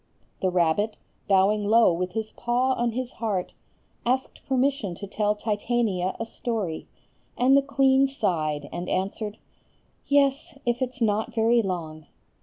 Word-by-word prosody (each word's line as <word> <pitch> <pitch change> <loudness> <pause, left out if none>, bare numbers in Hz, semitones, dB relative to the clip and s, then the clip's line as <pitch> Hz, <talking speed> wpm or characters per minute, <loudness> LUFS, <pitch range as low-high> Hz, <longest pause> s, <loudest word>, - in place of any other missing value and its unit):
The 185 - +2
rabbit, 180 +4 +1 0.3
bowing 200 +2 +3
low 220 -2 +5
with 180 +2 -3
his 220 -1 -3
paw 250 +2 0
on 240 -2 -1
his 255 +1 -3
heart, 205 -6 -2 0.5
asked 260 +2 -1
permission 265 -7 0
to 200 - -7
tell 210 +1 0
Titania 210 -3 -1
a 230 - -2
story, 220 -8 -3 0.5
and 260 +2 +5
the 280 - +6
queen 275 -1 +3
sighed, 155 - -1
and 175 +1 -4
answered,— 205 +3 -2 0.7
"Yes, 280 +1 +2
if 240 +1 0
it's 255 +1 -3
not 215 0 0
very 230 +1 +4
long." 160 -6 -5
220 Hz, 140 wpm, -25 LUFS, 190-250 Hz, 0.7 s, the